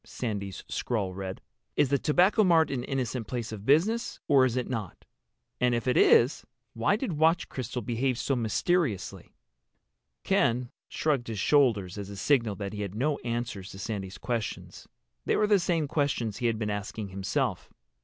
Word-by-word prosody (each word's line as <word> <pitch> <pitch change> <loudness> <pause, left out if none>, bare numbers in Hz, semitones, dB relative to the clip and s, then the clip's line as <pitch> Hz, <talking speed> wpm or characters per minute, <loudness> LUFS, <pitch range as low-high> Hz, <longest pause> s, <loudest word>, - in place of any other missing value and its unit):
Sandy's 100 -5 -5
scrawl 100 -6 -2
read. 95 0 -6 0.3
"Is 140 - +3
the 140 0 +2
Tobacco 185 - +4
Mart 165 -5 +4
an 125 -3 -2
innocent 125 -4 -2
place 120 -3 -4
of 105 -1 -8
business—or 155 - +3
is 130 -1 -1
it 125 - -1
not? 110 -8 -5 0.5
And 125 -1 +3
if 115 +1 -3
it 125 - +2
is 125 +6 +5 0.3
why 115 - +2
did 215 -4 -3
Watch 165 +2 +3
Crystal 125 -1 -4
behave 120 +3 0
so 135 - 0
mysteriously?" 120 - -1 0.9
Ken 120 +1 +1 0.2
shrugged 140 -6 0
his 110 -2 -4
shoulders 105 -6 +2
as 100 -1 -6
a 100 - -8
signal 115 -2 +2
that 100 0 -5
he 105 - -4
had 100 -1 -4
no 140 +5 0
answers 115 -5 -4
to 95 - -10
Sandy's 100 -2 -5
questions. 120 -3 -4 0.4
They - - +2
were 210 - +3
the 210 -1 +4
same 170 -4 0
questions 140 -8 -1
he 120 - 0
had 115 -1 0
been 105 -1 -2
asking 105 0 -4
himself. 95 0 -2
120 Hz, 170 wpm, -28 LUFS, 105-140 Hz, 0.9 s, is